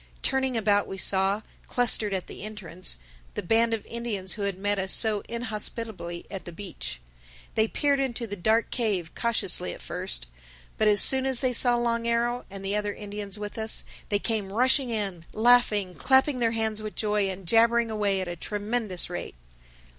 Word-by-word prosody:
Turning 265 -2 0
about 205 -2 +2
we 195 - -6
saw, 195 +2 +2 0.2
clustered 235 -4 +2
at 190 -2 -2
the - - -10
entrance, 185 - 0 0.4
the - - -3
band 230 +5 +2
of 225 -2 -2
Indians 220 -6 -2
who 210 - -7
had 200 -2 -2
met 205 +1 0
us 190 0 0
so 215 -3 +6
inhospitably 220 -6 -4
at 195 -2 -6
the 175 - -7
beach. 165 - -7 0.5
They 220 0 +2
peered 285 +3 +1
into 250 -3 -2
the 205 -2 -6
dark 220 +5 +1
cave 200 -9 -1
cautiously 205 - 0
at - - -11
first. - - -3 0.5
But 215 - +3
as 205 -1 +8
soon 265 0 +7
as 260 -2 0
they 255 -2 +1
saw 245 0 +4
Long 235 -1 -1
Arrow 240 +1 0
and 195 0 -8
the 200 +1 -1
other 210 -1 -2
Indians 205 -1 -5
with 210 +1 -6
us, 220 0 -1 0.3
they 205 - +2
came 205 -2 -2
rushing 255 +4 +2
in, 195 -7 -3
laughing, 220 -5 +3
clapping 265 +4 +2
their 235 -2 +2
hands 220 -1 -1
with 215 -1 -7
joy 210 -2 0
and 190 -1 -7
jabbering 230 +2 +3
away 205 -3 0
at 185 - -4
a 175 - -4
tremendous 210 +1 -3
rate. 175 - -6
215 Hz, 185 wpm, -26 LUFS, 195-235 Hz, 0.5 s, as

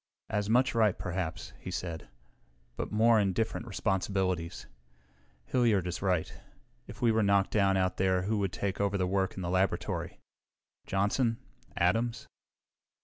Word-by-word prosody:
"As 105 -1 -1
much 125 +2 +3
right, 110 -4 +3
perhaps," 90 -3 -4
he - - -7
said, 85 -3 -5 0.7
"but - - -4
more 110 +1 +5
and 95 -3 +1
different 115 +1 -2
responsibilities. 95 -4 -1 0.8
Hilliard 110 - +2
is 90 -1 -4
right. 90 -4 -1 0.5
If 105 +3 -9
we 115 - +5
were 110 0 +2
knocked 100 -1 +3
down 100 -2 +3
out 95 -1 0
there 95 -1 +2
who 105 +2 0
would 100 -2 0
take 100 +1 -2
over 100 0 +1
the 90 - +1
work 95 +1 0
in 95 - -5
the 85 - -2
laboratory? 95 0 -1 0.7
Johnson? 110 +4 +1 0.4
Adams? 115 +6 +1
100 Hz, 145 wpm, -30 LUFS, 95-110 Hz, 0.8 s, more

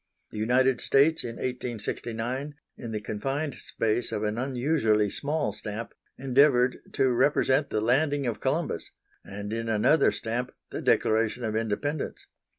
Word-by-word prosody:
The 105 - -6
United 125 +3 +2
States, 155 +4 +3
in 115 -1 -5
1869, 125 +2 -3 0.2
in 115 - -7
the 105 -1 -3
confined 135 +8 -3
space 115 +2 -1
of 105 - -2
an 105 +2 -1
unusually 125 -5 +1
small 150 +1 -1
stamp, 110 +2 -6 0.2
endeavoured 130 -1 +3
to 130 - +3
represent 135 +2 +2
the 110 - 0
landing 140 +4 +2
of 120 -3 -2
Columbus, - - -1 0.3
and 105 +2 -6
in 115 0 -3
another 110 +9 +4
stamp 120 +2 -3 0.2
the - - -4
Declaration 110 +2 +2
of 110 -1 -2
Independence. 115 +7 -2
120 Hz, 140 wpm, -27 LUFS, 110-135 Hz, 0.3 s, another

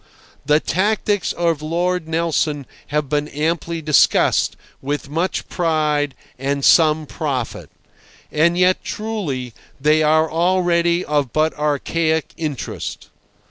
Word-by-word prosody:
The 150 0 +5
tactics 205 +3 0
of 165 -3 0
Lord 170 +2 -1
Nelson 160 -3 0 0.2
have 150 0 -1
been 150 +2 -1
amply 165 +2 -2
discussed, 150 -1 +3 0.3
with 140 0 -4
much 170 +4 -1
pride 150 -5 0 0.2
and 140 +1 -1
some 155 -2 +5
profit. 140 -6 -4 0.6
And 170 +3 +2
yet, 180 +1 +3
truly, 165 - -4 0.3
they 150 +3 +3
are 155 +1 +3
already 175 0 +2
of 145 -5 0
but 155 +3 +1
archaic 155 +2 -1
interest. 150 -6 -5
155 Hz, 110 wpm, -20 LUFS, 150-170 Hz, 0.6 s, The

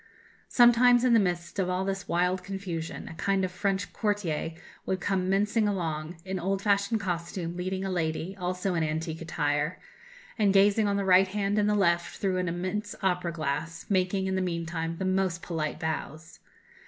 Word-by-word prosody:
Sometimes, 240 0 +6
in 250 -2 +4
the 230 - +7
midst 175 -1 -1
of 185 -1 +1
all 180 +1 0
this 195 0 -3
wild 180 +2 +1
confusion, 180 -4 -5
a - - -7
kind 190 +3 0
of 185 - -5
French 195 +2 -1
courtier 195 -7 -1 0.3
would 190 - -1
come 185 0 0
mincing 210 +3 +2
along, 165 -4 -2
in 190 0 -3
old 195 +2 0
fashioned 200 +2 +2
costume, 175 -2 -3
leading 185 +2 -3
a 190 - -2
lady, 165 +1 -2
also 180 0 -2
in 165 -2 +1
antique 160 +1 -3
attire, 150 0 -1 0.6
and, 200 -2 +3
gazing 205 +2 +5
on 200 0 +1
the 200 - -1
right 190 0 +6
hand 200 +1 0
and 210 0 +2
the 210 - +2
left 170 -4 +1
through 190 -2 0
an 180 0 -1
immense 185 +4 -3
opera 180 -2 +1
glass, 160 +1 -3
making, 190 0 +1
in 190 - -1
the 190 - 0
meantime, 165 -2 -3
the 190 - -3
most 185 -2 0
polite 155 -3 -3
bows. 160 0 -5
185 Hz, 180 wpm, -28 LUFS, 170-195 Hz, 0.6 s, the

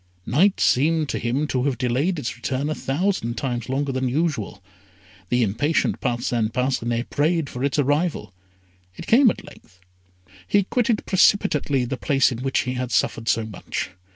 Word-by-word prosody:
Night 185 - +3
seemed 155 +3 +2
to - - -2
him 125 +6 -1
to 130 -3 -1
have 135 -4 0
delayed 130 +10 0
its 130 -6 -4
return 135 +4 -2
a - - +1
thousand 140 -5 -1
times 120 -4 -3
longer 135 +1 -1
than 130 -1 -1
usual. 140 - -2 0.7
The 125 0 +2
impatient 120 +10 0
Parcin 120 -3 0
Parcinet 120 -1 -1
prayed 155 0 0
for 125 - -5
its 140 +1 0
arrival. 145 - 0 0.6
It - - -8
came 245 +2 +6
at - - -5
length. 95 -4 -17 0.7
He 200 - +3
quitted 230 +2 0
precipitately 155 -9 +2
the 130 +2 -4
place 135 -3 +2
in 120 - -5
which 135 +1 0
he 125 - -3
had 125 -1 -3
suffered 115 - 0
so 110 +2 +1
much. 100 -3 -5
135 Hz, 165 wpm, -23 LUFS, 120-155 Hz, 0.7 s, came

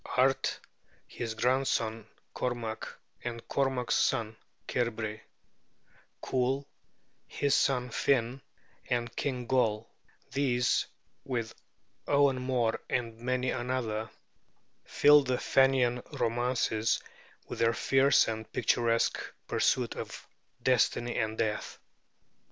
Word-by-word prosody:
Art, 135 +1 +2 0.5
his 115 -2 -5
grandson 115 -3 0 0.3
Cormac, 120 -3 -3 0.4
and 115 -1 -6
Cormac's 135 -3 0
son, 110 -4 +1 0.3
Cairbre; 110 -3 -2 1.0
Cool, 130 +2 0 0.6
his 140 -1 0
son 125 -4 +2
Finn, 125 +1 +1 0.5
and 120 -1 -1
King 125 -3 -2
Goll: 115 -4 +1 0.4
these, 125 -3 +1 0.4
with 115 -4 -3 0.5
Owen 140 -2 +3
Mor 125 -3 0
and 115 -2 -1
many 125 +1 0
another, 120 -3 -2 0.8
fill 145 0 +6
the 130 -2 -1
Fenian 130 -3 +3
romances 115 -2 0 0.5
with - - -7
their 115 0 +3
fierce 135 +3 +4
and 110 -1 -4
picturesque 115 -1 +1 0.3
pursuit - - +1
of - - -7 0.4
destiny 120 -1 +2
and 110 0 -1
death. 110 -2 -2
125 Hz, 95 wpm, -30 LUFS, 115-130 Hz, 1.0 s, fill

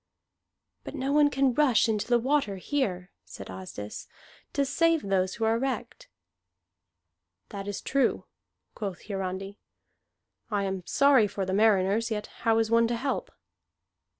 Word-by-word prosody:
"But - - -8
no 270 +1 -2
one 295 0 +5
can 270 -2 +2
rush 255 -5 +4
into 215 -2 -1
the 240 0 +4
water 255 -4 0
here," 190 -5 -2
said 95 - -10
Asdis, 95 +3 -8 0.4
"to 280 - +1
save 330 +3 +2
those 190 -1 0
who 225 - -4
are 225 +1 +2
wrecked." 260 -3 -4 1.4
"That 200 0 -7
is 205 - -4
true," 275 0 0 0.5
quoth 195 -5 -5
Hiarandi. 195 0 -5 0.9
"I 205 -3 0
am 190 -1 -2
sorry 275 -6 +5
for 195 -1 -3
the 190 - -2
mariners, 210 +1 +3
yet 210 -2 -3 0.2
how 225 -1 +3
is 225 0 +1
one 230 0 +4
to 240 - -1
help?" 265 +3 -2
220 Hz, 145 wpm, -28 LUFS, 195-265 Hz, 1.4 s, one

